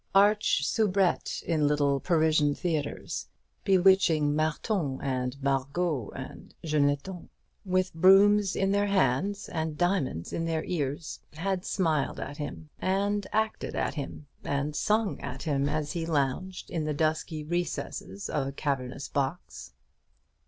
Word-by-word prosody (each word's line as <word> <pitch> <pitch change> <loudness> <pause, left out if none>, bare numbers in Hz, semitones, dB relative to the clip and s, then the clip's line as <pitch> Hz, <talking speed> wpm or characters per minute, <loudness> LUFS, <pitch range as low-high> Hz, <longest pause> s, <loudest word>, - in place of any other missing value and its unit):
Arch 205 -6 +4
soubrettes 200 -2 +1
in 155 -3 +1
little 145 -2 +2
Parisian 155 -3 +2
theatres, 160 -5 -3 0.4
bewitching 185 -6 +4
Marthons 155 -1 -1
and 130 -1 -2
Margots 140 - 0
and - - -9
Jeannettons, 150 +4 0 0.4
with 185 0 +1
brooms 195 +3 +5
in 195 0 +1
their 205 0 +2
hands 195 +2 +1
and 160 -2 -3
diamonds 175 - 0
in 165 - -1
their 160 -1 -1
ears, 150 -2 -3
had 185 +3 -2
smiled 160 -7 0
at 145 - -6
him, 150 +1 -6
and 200 +1 0
acted 220 +1 -1
at - - -1
him, 145 0 -6 0.2
and 145 +1 -1
sung 215 +3 +1
at 135 -1 -6
him, 140 -3 0
as 150 0 -1
he 170 - -2
lounged 160 +5 -1
in 165 -3 -1
the 150 -1 -1
dusky 155 0 -1
recesses 160 - -3
of 135 -3 -1
a - - -3
cavernous 135 -1 -3
box. 140 +5 -3
160 Hz, 130 wpm, -28 LUFS, 145-190 Hz, 0.4 s, brooms